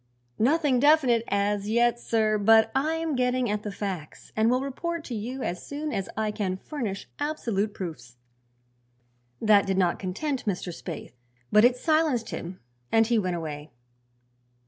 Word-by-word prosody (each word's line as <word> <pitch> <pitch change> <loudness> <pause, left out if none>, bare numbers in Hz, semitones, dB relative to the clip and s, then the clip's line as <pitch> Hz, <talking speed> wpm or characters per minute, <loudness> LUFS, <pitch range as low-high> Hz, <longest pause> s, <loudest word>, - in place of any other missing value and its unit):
"Nothing 280 +1 +3
definite 270 -5 +4
as 200 +1 0
yet, 235 +1 +3
sir; 215 -2 +1
but 220 +2 +5
I 300 +4 +1
am 325 -2 -2
getting 250 -2 +1
at 210 0 -1
the 210 - -5
facts 190 -6 -6
and 220 +1 +3
will 255 +1 +2
report 335 +5 -4
to 255 - -7
you 245 +4 -4
as 175 0 -3
soon 295 +1 -4
as 195 - -2
I 215 -1 0
can 190 -3 -2
furnish 215 -5 -5
absolute 230 -9 -1
proofs." 125 -10 -7 1.2
That 205 -2 +4
did 190 -1 0
not 180 -2 +2
content 245 +8 -3
Mr. 185 -2 -2
Spaythe, 165 -6 -7 0.4
but 210 - +6
it 245 +1 +5
silenced 310 -5 +1
him 180 +2 -6 0.3
and 225 0 +5
he 230 0 +2
went 185 -3 -1
away. 150 -2 -6
220 Hz, 160 wpm, -26 LUFS, 195-260 Hz, 1.2 s, but